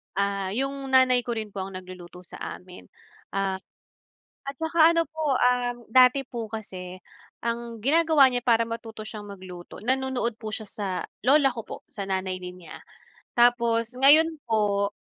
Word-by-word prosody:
Ah, 200 -1 -1
yung 275 +1 -2
nanay 255 -2 +5
ko 240 - -2
rin 215 -2 -5
po 195 -1 -4
ang 195 0 -9
nagluluto 180 -1 -10
sa - - -12 0.2
amin. 180 0 -14 0.5
Ah, 195 -1 -1 0.9
at 275 - -4
tsaka 325 0 +4
ano 335 - +3
po 310 -4 -1
um, 245 -1 +2 0.2
dati 255 +2 +6
po 230 -2 -5
kasi 185 -4 -7 0.4
ang 235 0 -3
ginagawa 310 -1 +5
niya 245 - 0
para 230 -1 +4
matuto 225 -1 -7
siyang 210 -2 -8
magluto, 185 -3 -10
nanonood 260 -2 0
po 215 -1 -6
siya 220 - -8
sa 205 -2 -5 0.4
lola 275 +1 +5
ko 240 -2 -6
po, - - -6
sa 200 -3 -5
nanay 190 -1 -2
din 180 0 -9
niya. - - -10 0.6
Tapos 235 -1 +3
ngayon 310 +5 +6
po, 205 -2 +1
230 Hz, 160 wpm, -26 LUFS, 195-260 Hz, 0.9 s, dati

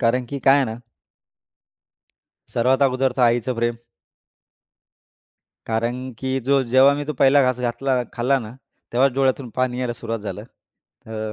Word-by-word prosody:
कारण 125 +1 +1
की 140 - -4
काय 135 - +7
आहे 140 - +3
ना 110 -2 -5 1.8
सर्वात 130 +3 +2
अगोदर 130 -1 +2
तर 130 - +1
आईचं 120 +1 +2
प्रेम. 120 0 -1 1.9
कारण 120 +3 -2
की 130 0 -2
जो 135 +2 +2
जेव्हा 130 +3 +5
मी 145 0 -4
तो 155 - -3
पहिला 140 +2 +4
घास 130 -1 +1
घातला 125 +1 -1
खाल्ला 130 +3 +1
ना, 115 -2 -9 0.4
तेव्हाच 130 +2 +3
डोळ्यातून 135 -1 0
पाणी 130 -1 0
यायला 125 -2 -2
सुरुवात 115 -1 -5
झालं. 105 0 -6 0.6
अ, 110 -1 -5
125 Hz, 150 wpm, -22 LUFS, 120-135 Hz, 1.9 s, काय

